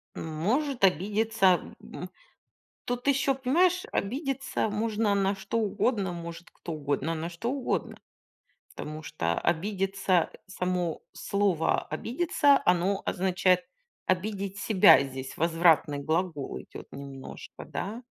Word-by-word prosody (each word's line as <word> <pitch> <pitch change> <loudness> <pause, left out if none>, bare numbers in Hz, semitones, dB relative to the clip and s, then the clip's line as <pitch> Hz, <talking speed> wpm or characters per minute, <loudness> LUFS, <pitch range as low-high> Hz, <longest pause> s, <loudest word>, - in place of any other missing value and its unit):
М, - - -5 0.2
может 265 - 0
обидеться, 195 +1 +3 0.2
м, - - -8 0.8
тут 245 +2 -3
ещё, 275 0 +3
понимаешь, 345 +8 +2
обидеться 270 +1 -1
можно 215 0 0
на 195 0 +1
что 195 +4 -3
угодно, 205 -2 0
может 170 0 -8
кто 170 - -7
угодно 145 +2 -1
на 165 +1 -3
что 195 +8 -3
угодно. 270 -2 -2 0.8
Потому 155 +1 -6
что, 85 - -2
а, - - -1
обидеться, 195 0 +1 0.2
само 180 -3 -2
слово 200 -5 +1
"обидеться"- 280 - +2
оно 180 +3 +2
означает 185 0 +2 0.5
обидеть 195 +1 -1
себя, 200 -9 +6
здесь 130 -1 -7
возвратный 165 -3 +3
глагол 160 -1 -2
идёт - - -11
немножко, 135 -1 -9
да? 220 +6 -5
190 Hz, 115 wpm, -28 LUFS, 165-225 Hz, 0.8 s, себя